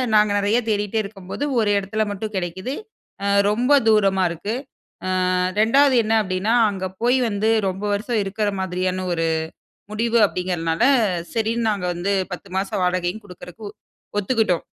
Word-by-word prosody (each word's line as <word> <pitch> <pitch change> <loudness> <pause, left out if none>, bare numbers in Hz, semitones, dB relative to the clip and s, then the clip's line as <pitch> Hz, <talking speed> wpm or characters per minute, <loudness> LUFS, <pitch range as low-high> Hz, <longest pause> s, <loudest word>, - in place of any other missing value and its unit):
நாங்க 210 -1 +4
நெறய 205 +4 +2
தேடிட்டே 210 +1 0
இருக்கம்போது, 195 +5 -7 0.2
ஒரு 215 - +2
இடத்துல 215 +3 -2
மட்டும் 210 +1 -5
கிடைக்குது. 185 +8 -4 0.7
ரொம்ப 240 +6 +1 0.2
தூரமா 195 -3 +4
இருக்கு. 170 +6 -4 0.8
ஆ, - - +1 0.2
2வது 270 +6 +4
என்ன 220 +1 0
அப்படின்னா, 195 +4 0 0.2
அங்க 190 -1 -4 0.2
போய் 245 +2 +3
வந்து, 215 +1 0 0.2
ரொம்ப 190 +2 -4
வருஷம் 215 +2 -1
இருக்குற 205 +2 -1
மாதிரியான 185 0 -2
ஒரு 165 -1 0 0.7
முடிவு 230 +2 +1
அப்படிங்கிறனால, 175 -1 -2 0.5
சரின்னு 225 0 0
நாங்க 195 -3 -2
வந்து, 185 +4 -1 0.2
10 185 +2 -7
மாச 195 +1 -1
வாடகையும் 180 +3 -1
குடுக்குறதுக்கு, 180 +3 -11
ஒ - - -20 0.4
ஒத்துக்கிட்டோம். 205 -4 +1
205 Hz, 140 wpm, -22 LUFS, 185-220 Hz, 0.8 s, நாங்க